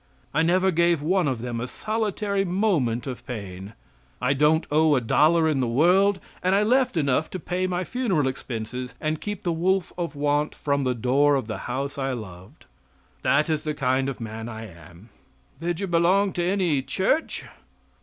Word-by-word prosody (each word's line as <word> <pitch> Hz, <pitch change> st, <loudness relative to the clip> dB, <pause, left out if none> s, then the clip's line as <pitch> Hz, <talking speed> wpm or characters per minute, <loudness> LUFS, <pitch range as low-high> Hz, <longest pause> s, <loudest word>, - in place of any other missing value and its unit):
I 155 Hz, -, +2 dB
never 185 Hz, +3 st, +3 dB
gave 170 Hz, -2 st, +2 dB
one 180 Hz, +1 st, +2 dB
of 125 Hz, -4 st, -2 dB
them 120 Hz, -2 st, -3 dB
a 125 Hz, -, -3 dB
solitary 210 Hz, -, -1 dB
moment 175 Hz, -, 0 dB
of 125 Hz, -3 st, -6 dB
pain. 100 Hz, -3 st, -7 dB, 0.5 s
I 125 Hz, +2 st, +2 dB
don't 150 Hz, +3 st, +3 dB
owe 155 Hz, 0 st, +4 dB
a -, -, +3 dB
dollar 160 Hz, +7 st, +3 dB
in 150 Hz, -3 st, +1 dB
the 125 Hz, -, +1 dB
world 185 Hz, +10 st, +3 dB, 0.2 s
and 185 Hz, +1 st, +2 dB
I 205 Hz, -, +3 dB
left 250 Hz, -2 st, +2 dB
enough 140 Hz, 0 st, +1 dB
to 185 Hz, -, -5 dB
pay 185 Hz, +2 st, -2 dB
my 180 Hz, 0 st, -1 dB
funeral 190 Hz, -, 0 dB
expenses 125 Hz, -1 st, -5 dB
and 155 Hz, 0 st, -2 dB
keep 205 Hz, -1 st, -5 dB
the 175 Hz, -, 0 dB
wolf 180 Hz, +2 st, 0 dB
of 170 Hz, -3 st, -3 dB
want 145 Hz, +1 st, 0 dB
from 140 Hz, -2 st, -1 dB
the 125 Hz, -1 st, +1 dB
door 135 Hz, +5 st, +3 dB
of 135 Hz, -, -1 dB
the 110 Hz, -1 st, -5 dB
house 140 Hz, +1 st, -3 dB
I 135 Hz, -1 st, -1 dB
loved. 95 Hz, -6 st, -10 dB, 0.6 s
That 150 Hz, +2 st, +2 dB
is 155 Hz, -2 st, -1 dB
the 150 Hz, -1 st, -2 dB
kind 130 Hz, +1 st, +1 dB
of 135 Hz, -, -6 dB
a -, -, -5 dB
man 110 Hz, +1 st, -6 dB
I 110 Hz, -1 st, -7 dB
am." 85 Hz, +2 st, -15 dB, 0.5 s
"Did 170 Hz, +1 st, -2 dB
you 200 Hz, -, -1 dB
belong 185 Hz, +3 st, +2 dB
to 175 Hz, -, -1 dB
any 175 Hz, -6 st, +1 dB
church?" 195 Hz, -, -1 dB
150 Hz, 190 wpm, -25 LUFS, 125-180 Hz, 0.6 s, owe